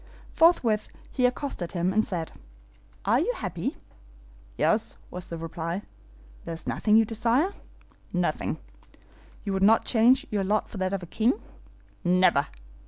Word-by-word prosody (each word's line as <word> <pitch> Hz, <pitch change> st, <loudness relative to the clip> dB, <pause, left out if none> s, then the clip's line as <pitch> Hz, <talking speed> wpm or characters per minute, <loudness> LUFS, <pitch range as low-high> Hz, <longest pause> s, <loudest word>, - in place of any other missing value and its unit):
Forthwith 245 Hz, -11 st, +3 dB, 0.2 s
he 250 Hz, -2 st, +3 dB
accosted 250 Hz, -9 st, -4 dB
him, 180 Hz, +1 st, 0 dB
and 215 Hz, +2 st, +3 dB
said, 170 Hz, -6 st, -3 dB, 0.7 s
'Are -, -, +4 dB
you -, -, +1 dB
happy?' -, -, -4 dB, 0.8 s
'Yes,' -, -, +1 dB
was 180 Hz, 0 st, -6 dB
the 170 Hz, -, -5 dB
reply. 165 Hz, +3 st, -4 dB, 0.6 s
'There 165 Hz, -, -5 dB
is 165 Hz, -, -9 dB
nothing 215 Hz, 0 st, +3 dB
you 225 Hz, -, +5 dB
desire?' 235 Hz, -, +1 dB, 0.6 s
'Nothing.' -, -, -1 dB, 0.9 s
'You 200 Hz, -, -2 dB
would 190 Hz, -, -1 dB
not 220 Hz, +3 st, +5 dB
change 240 Hz, +3 st, +4 dB
your 205 Hz, -2 st, 0 dB
lot 210 Hz, +3 st, 0 dB
for -, -, -8 dB
that 185 Hz, +1 st, -1 dB
of 195 Hz, -2 st, -2 dB
a -, -, -5 dB
king?' 225 Hz, +8 st, +2 dB, 0.7 s
'Never! 180 Hz, -5 st, +4 dB
205 Hz, 145 wpm, -27 LUFS, 180-230 Hz, 0.9 s, you